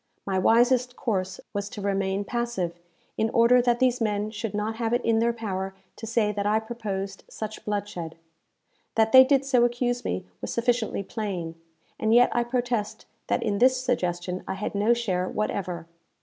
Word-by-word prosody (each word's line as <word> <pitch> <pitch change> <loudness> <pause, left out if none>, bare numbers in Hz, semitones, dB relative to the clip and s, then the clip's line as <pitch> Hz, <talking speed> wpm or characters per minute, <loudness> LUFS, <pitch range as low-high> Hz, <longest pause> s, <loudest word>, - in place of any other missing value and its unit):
My 190 -1 0
wisest 245 +4 +3
course 190 -5 -2
was 205 -1 -3
to 210 - -8
remain 195 0 -1
passive, 215 -9 -2 0.4
in 220 +1 +2
order 235 +1 +5
that 240 -1 +2
these 250 -1 +2
men 210 -1 0
should 215 -1 -4
not 215 +2 -2
have 230 -1 -1
it 245 - 0
in 225 -1 +3
their 235 +1 +3
power 195 -4 -4 0.2
to 225 - -7
say 220 -2 +1
that 205 0 -2
I 215 +1 +3
proposed 205 -4 -5
such 215 0 -6
bloodshed. 200 -6 -4 0.8
That 220 0 +3
they 260 +1 +10
did 270 0 +2
so 255 -3 +3
accuse 245 0 0
me 90 +1 -3 0.2
was - - -4
sufficiently 235 -3 0
plain, 185 -5 -4 0.5
and 220 +1 +3
yet 245 +1 +5
I 240 - +3
protest 240 -3 -2 0.2
that - - 0
in 205 -2 0
this 255 +1 +5
suggestion 180 -8 -2
I - - -2
had 200 +2 -4
no 210 +4 +3
share 185 -6 -1
whatever. 185 -5 -3
220 Hz, 175 wpm, -26 LUFS, 195-240 Hz, 0.8 s, they